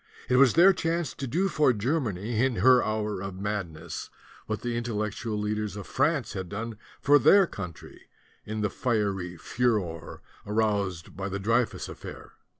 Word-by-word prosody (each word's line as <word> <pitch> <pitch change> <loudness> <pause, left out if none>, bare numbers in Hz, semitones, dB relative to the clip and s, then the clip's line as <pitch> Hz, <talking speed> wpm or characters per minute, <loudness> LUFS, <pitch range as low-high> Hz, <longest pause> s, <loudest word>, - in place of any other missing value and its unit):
It 125 - +4
was 130 -3 +6
their 185 +4 +7
chance 165 -4 -1
to 135 - -5
do 175 +10 +1
for 150 -8 +3
Germany 115 - -1
in 130 -2 +1
her 130 0 +5
hour 105 -2 -2
of 100 -1 -6
mad 100 -3 -2
ness 80 +1 -7 0.4
what 110 -1 -3
the 120 -1 -2
Intellectual 110 -1 -2
leaders 105 0 -2
of 100 - -7
France 145 -2 0
had 95 -3 -5
done 110 +2 -5 0.2
for 145 +1 +5
their 195 +9 +6
country 90 - -9 0.3
in 110 0 -4
the 105 -2 0
fiery 100 -7 -1
furor 95 -6 -2 0.2
aroused 100 -5 -1
by 100 +2 -4
the 100 - -3
Dreyfus 115 +4 0
affair. - - -10
110 Hz, 160 wpm, -27 LUFS, 100-125 Hz, 0.4 s, their